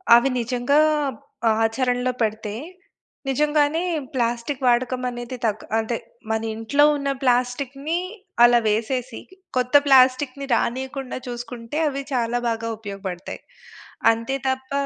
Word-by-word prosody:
అవి 240 Hz, +3 st, +4 dB
నిజంగా 245 Hz, +4 st, +1 dB, 0.9 s
ఆచరణలో 250 Hz, +2 st, +1 dB
పెడితే, 215 Hz, -1 st, -1 dB, 0.8 s
నిజంగానే 300 Hz, +3 st, +2 dB, 0.3 s
ప్లాస్టిక్కు 240 Hz, +2 st, -1 dB
వాడకమనేది 250 Hz, 0 st, 0 dB
తగ్ 215 Hz, -1 st, -1 dB
ఆదే, 225 Hz, +1 st, -1 dB, 0.3 s
మనింట్లో 225 Hz, +6 st, +1 dB
ఉన్న 280 Hz, -1 st, -2 dB
ప్లాస్టిక్కుని 270 Hz, +5 st, 0 dB, 0.5 s
అలా 240 Hz, 0 st, +7 dB
వేసేసి, 235 Hz, +3 st, -1 dB, 0.4 s
కొత్త 250 Hz, +2 st, 0 dB
ప్లాస్టిక్కుని 265 Hz, +1 st, +4 dB
రానీయకుండా 265 Hz, +1 st, -2 dB
చూసుకుంటే, 240 Hz, +2 st, -6 dB
అవి 275 Hz, -1 st, -2 dB
చాలా 240 Hz, -1 st, 0 dB
బాగా 230 Hz, 0 st, -2 dB
ఉపయోగపడతాయి. 195 Hz, -4 st, -6 dB, 0.7 s
అంతే 230 Hz, +4 st, -2 dB
తప్ప 260 Hz, 0 st, -2 dB
245 Hz, 95 wpm, -23 LUFS, 230-270 Hz, 0.9 s, అలా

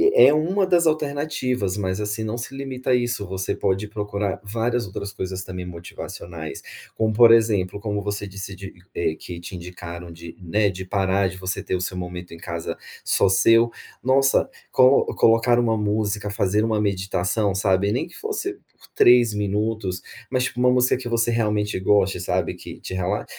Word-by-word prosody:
é 475 Hz, -, +8 dB
1 185 Hz, +6 st, +2 dB
das 175 Hz, -3 st, +3 dB
alternativas. 140 Hz, -9 st, -1 dB
Mas, 95 Hz, -1 st, -2 dB
assim, 105 Hz, +1 st, -2 dB
não 110 Hz, +2 st, -3 dB
se 130 Hz, +3 st, -6 dB
limita 130 Hz, -1 st, -3 dB
a 125 Hz, -, +6 dB
isso, 120 Hz, -5 st, -1 dB
você 95 Hz, 0 st, -2 dB
pode 95 Hz, +2 st, -1 dB
procurar, 105 Hz, -2 st, -3 dB
várias, 115 Hz, +2 st, -1 dB
outras 100 Hz, +2 st, -6 dB
coisas, 95 Hz, 0 st, -5 dB
também, 90 Hz, -1 st, -6 dB
motivacionais, 85 Hz, -1 st, -8 dB, 0.3 s
como, 110 Hz, -1 st, +1 dB
por 120 Hz, +1 st, +7 dB
exemplo, 105 Hz, -5 st, +2 dB
como 105 Hz, -1 st, -3 dB
você 100 Hz, 0 st, -3 dB
disse 100 Hz, 0 st, -7 dB
de 95 Hz, +1 st, -9 dB, 0.2 s
eh, 80 Hz, -2 st, 0 dB
que 90 Hz, -1 st, -8 dB
te 85 Hz, +2 st, -9 dB
indicaram 85 Hz, -1 st, -8 dB
de, 85 Hz, 0 st, -11 dB
né, 100 Hz, +4 st, +1 dB
de 95 Hz, 0 st, -6 dB
parar 95 Hz, 0 st, +1 dB
de 95 Hz, -, -6 dB
você 95 Hz, 0 st, -3 dB
ter -, -, -2 dB
o 90 Hz, -, -2 dB
seu 90 Hz, 0 st, -3 dB
momento 90 Hz, -1 st, -6 dB
em 85 Hz, -, -9 dB
casa, 85 Hz, 0 st, -5 dB, 0.3 s
só -, -, +3 dB
seu. 115 Hz, +5 st, +5 dB, 0.3 s
Nossa, 135 Hz, +2 st, +3 dB, 0.2 s
colo 130 Hz, +1 st, +5 dB
colocar 115 Hz, +1 st, +4 dB
uma 115 Hz, -2 st, +2 dB
música, 105 Hz, -1 st, -1 dB
fazer 100 Hz, +1 st, +1 dB
uma 110 Hz, -1 st, +1 dB
meditação 95 Hz, 0 st, 0 dB
sabe, 95 Hz, +1 st, +2 dB
nem 125 Hz, -, -1 dB
que 170 Hz, -, -16 dB
fosse 415 Hz, -3 st, -3 dB
por 390 Hz, -, -23 dB
3 120 Hz, -2 st, +6 dB
minutos, 105 Hz, -2 st, -1 dB, 0.3 s
mas 130 Hz, -1 st, +1 dB
tipo 125 Hz, -, -4 dB
uma 125 Hz, 0 st, +5 dB
música 125 Hz, 0 st, +3 dB
que 125 Hz, -2 st, -6 dB
você, 115 Hz, 0 st, +1 dB
realmente, 105 Hz, -2 st, 0 dB
goste, 95 Hz, -1 st, +3 dB
sabe, -, -, -1 dB
que -, -, -10 dB
te -, -, -7 dB
rela 95 Hz, 0 st, -1 dB
105 Hz, 180 wpm, -23 LUFS, 95-120 Hz, 0.3 s, é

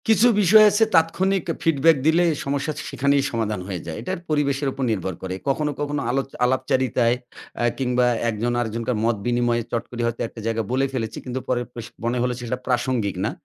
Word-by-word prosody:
কিছু 220 Hz, +2 st, +5 dB
বিষয় 215 Hz, +3 st, +7 dB
আছে, 215 Hz, +2 st, +3 dB
তাৎক্ষণিক 185 Hz, +3 st, +2 dB, 0.2 s
ফিডব্যাক 165 Hz, 0 st, +4 dB
দিলে, 165 Hz, +2 st, +4 dB, 0.2 s
সমস্যা 140 Hz, +2 st, -1 dB, 0.2 s
সেখানেই 140 Hz, 0 st, +2 dB
সমাধান 110 Hz, -4 st, -1 dB
হয়ে 95 Hz, -3 st, -4 dB
যায়। 80 Hz, -2 st, -5 dB
এটার 185 Hz, -1 st, -4 dB
পরিবেশের 140 Hz, -2 st, +1 dB
উপর 135 Hz, -, -4 dB
নির্ভর 95 Hz, -3 st, -2 dB
করে। 95 Hz, 0 st, -3 dB
কখনো, 150 Hz, +2 st, +1 dB
কখনো 145 Hz, 0 st, -2 dB
আলো 135 Hz, +3 st, +1 dB, 0.2 s
আলাপচারিতায় 125 Hz, -2 st, +1 dB, 0.5 s
এ -, -, +4 dB
কিংবা 125 Hz, -1 st, +2 dB, 0.2 s
একজন 115 Hz, +2 st, -1 dB
আরেকজনকার 115 Hz, +1 st, -2 dB
মত 115 Hz, 0 st, +2 dB
বিনিময়ে, 120 Hz, -1 st, +1 dB
চট 115 Hz, -, -1 dB
করে 120 Hz, -1 st, -4 dB
হয়তো 115 Hz, 0 st, -3 dB
একটা 115 Hz, -, -12 dB
জায়গা 115 Hz, 0 st, 0 dB
বলে 135 Hz, +2 st, +2 dB
ফেলেছি। 115 Hz, -4 st, -3 dB
কিন্তু 130 Hz, 0 st, -3 dB
পরের 120 Hz, -1 st, 0 dB
প্রশ 120 Hz, -2 st, -7 dB, 0.2 s
মনে 120 Hz, +1 st, 0 dB
হলো 125 Hz, 0 st, 0 dB
যে -, -, -8 dB
সেটা 125 Hz, +2 st, -2 dB
প্রাসঙ্গিক 125 Hz, -5 st, 0 dB
না। -, -, -1 dB
125 Hz, 185 wpm, -23 LUFS, 115-145 Hz, 0.5 s, বিষয়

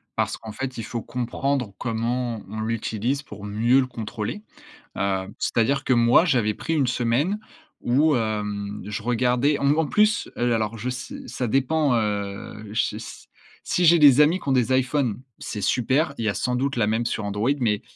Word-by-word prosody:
Parce -, -, -1 dB
qu'en 110 Hz, -1 st, -9 dB
fait, 130 Hz, +4 st, -5 dB
il 115 Hz, -, -4 dB
faut 115 Hz, +2 st, -4 dB
comprendre 125 Hz, -2 st, -2 dB
comment, 115 Hz, 0 st, -2 dB
on 110 Hz, +2 st, -6 dB
l'utilise 115 Hz, +4 st, -2 dB
pour 105 Hz, -4 st, -11 dB
mieux 115 Hz, +6 st, +2 dB
le 130 Hz, -, +1 dB
contrôler. 115 Hz, -, -5 dB, 0.5 s
Heu, 95 Hz, -1 st, -1 dB
c'est-à-dire 135 Hz, +4 st, +1 dB
que 130 Hz, -, +2 dB
moi, 120 Hz, +7 st, +5 dB
j'avais 120 Hz, -10 st, +2 dB
pris 165 Hz, -, -4 dB
1 140 Hz, -4 st, +2 dB
semaine 125 Hz, -, 0 dB, 0.4 s
où, 145 Hz, +4 st, +3 dB
hem, 105 Hz, -2 st, -3 dB
je 105 Hz, +1 st, -4 dB
regardais, 125 Hz, +4 st, +2 dB
en 140 Hz, -, +1 dB
m 150 Hz, +3 st, +3 dB
en 160 Hz, -, +2 dB
plus, 210 Hz, +6 st, +2 dB
heu, 120 Hz, -, +1 dB
l 120 Hz, -, +2 dB
alors 110 Hz, 0 st, -1 dB
je 120 Hz, -, -4 dB
s 125 Hz, -, -5 dB
ça 125 Hz, -, -3 dB
dépend, 135 Hz, +4 st, +2 dB
heu, 105 Hz, -1 st, -3 dB
ch -, -, 0 dB
si -, -, -10 dB, 0.4 s
si 180 Hz, -, 0 dB
j'ai 170 Hz, +1 st, +7 dB
des 145 Hz, -3 st, +7 dB
amis 160 Hz, +5 st, +3 dB
qui -, -, -8 dB
ont -, -, +3 dB
des 125 Hz, -1 st, +2 dB
iPhone, 130 Hz, -3 st, +1 dB, 0.2 s
c'est 105 Hz, -, -5 dB
super. 130 Hz, -, +1 dB
Il 115 Hz, -, -2 dB
y -, -, +1 dB
a -, -, -4 dB
sans 125 Hz, +6 st, -1 dB
doute 135 Hz, +2 st, -1 dB
la 115 Hz, -3 st, +2 dB
même 110 Hz, +2 st, 0 dB
sur 110 Hz, -, -2 dB
Android, 105 Hz, +5 st, 0 dB
mais, 105 Hz, -4 st, +1 dB
120 Hz, 195 wpm, -24 LUFS, 110-135 Hz, 0.5 s, j'ai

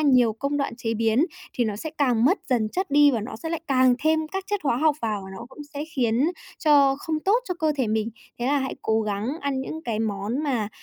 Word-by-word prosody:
nhiều 255 Hz, -6 st, +4 dB
công 280 Hz, +6 st, -2 dB
đoạn 275 Hz, -4 st, -2 dB
chế 225 Hz, -1 st, -2 dB
biến 225 Hz, +5 st, +3 dB, 0.3 s
thì 240 Hz, -, +1 dB
nó 210 Hz, -2 st, -2 dB
sẽ 315 Hz, +9 st, -5 dB
càng 245 Hz, -5 st, +3 dB
mất 360 Hz, +10 st, +4 dB
dần 235 Hz, -5 st, +2 dB
chất 375 Hz, -, -3 dB
đi 290 Hz, 0 st, +6 dB
và 235 Hz, -5 st, 0 dB
nó 220 Hz, +2 st, -6 dB
sẽ 325 Hz, -, -6 dB
lại 330 Hz, -1 st, -2 dB
càng 255 Hz, -2 st, +4 dB
thêm 315 Hz, 0 st, +2 dB
các 385 Hz, +3 st, -4 dB
chất 410 Hz, 0 st, -1 dB
hóa 255 Hz, -, +2 dB
học 305 Hz, +3 st, +3 dB
vào, 215 Hz, -3 st, -1 dB
nó 235 Hz, -, -8 dB
cũng -, -, -17 dB, 0.2 s
sẽ 285 Hz, +1 st, -3 dB
khiến 255 Hz, -5 st, +1 dB, 0.3 s
cho 280 Hz, -3 st, +5 dB
không 310 Hz, +1 st, -2 dB
tốt 400 Hz, +8 st, +3 dB
cho 360 Hz, -, -1 dB
cơ 315 Hz, -3 st, +1 dB
thể 260 Hz, -4 st, +1 dB
mình. 220 Hz, +1 st, 0 dB, 0.3 s
Thế 240 Hz, -, -2 dB
là 285 Hz, +2 st, +3 dB
hãy 265 Hz, -1 st, -3 dB
cố 220 Hz, 0 st, +2 dB
gắng 210 Hz, +1 st, -2 dB
ăn 280 Hz, -2 st, -1 dB
những 315 Hz, +4 st, -6 dB
cái 230 Hz, -6 st, -2 dB
món 220 Hz, +4 st, -2 dB
mà 240 Hz, -8 st, 0 dB
265 Hz, 250 wpm, -25 LUFS, 225-300 Hz, 0.3 s, đi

